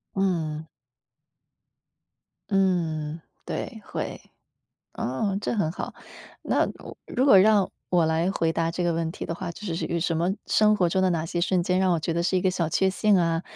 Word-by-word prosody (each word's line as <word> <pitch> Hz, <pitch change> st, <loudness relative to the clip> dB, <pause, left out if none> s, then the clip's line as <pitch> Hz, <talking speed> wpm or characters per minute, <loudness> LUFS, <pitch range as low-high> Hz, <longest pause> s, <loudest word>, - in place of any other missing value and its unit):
嗯。 160 Hz, -5 st, -1 dB, 1.8 s
嗯， 165 Hz, -5 st, 0 dB, 0.2 s
对， -, -, -5 dB
会， -, -, -5 dB, 0.7 s
哦， 190 Hz, -, -2 dB
这 210 Hz, -, -2 dB
很 165 Hz, -8 st, 0 dB
好。 -, -, -6 dB, 0.5 s
那， -, -, +1 dB, 0.4 s
如 255 Hz, -, 0 dB
果 200 Hz, -9 st, +8 dB
让 205 Hz, -1 st, +4 dB, 0.2 s
我 175 Hz, -2 st, +3 dB
来 160 Hz, +3 st, +1 dB
回 165 Hz, -4 st, 0 dB
答 165 Hz, 0 st, 0 dB
这 175 Hz, +1 st, -2 dB
个 175 Hz, -, +2 dB
问 165 Hz, 0 st, -1 dB
题 -, -, -7 dB
的 165 Hz, -, -3 dB
话， 175 Hz, 0 st, -5 dB
就 170 Hz, -, -11 dB
是 175 Hz, -5 st, -2 dB
这 -, -, -2 dB
个 170 Hz, -, -1 dB
什 165 Hz, 0 st, 0 dB
么 170 Hz, +3 st, +1 dB, 0.2 s
生 215 Hz, 0 st, +4 dB
活 180 Hz, -, +3 dB
中 180 Hz, +3 st, +1 dB
的 185 Hz, -, +3 dB
哪 165 Hz, -3 st, 0 dB
些 175 Hz, +1 st, -2 dB
瞬 180 Hz, 0 st, +1 dB
间 180 Hz, +1 st, +1 dB
让 190 Hz, -1 st, +3 dB
我 -, -, +1 dB
觉 160 Hz, +2 st, -2 dB
得 170 Hz, +1 st, 0 dB
是 185 Hz, +2 st, +1 dB
一 180 Hz, -, +1 dB
个 190 Hz, -, +3 dB
小 170 Hz, -3 st, -1 dB
确 190 Hz, +4 st, +2 dB
幸 205 Hz, +1 st, +3 dB
啊？ 165 Hz, -1 st, +1 dB
175 Hz, 210 characters per minute, -25 LUFS, 165-190 Hz, 1.8 s, 果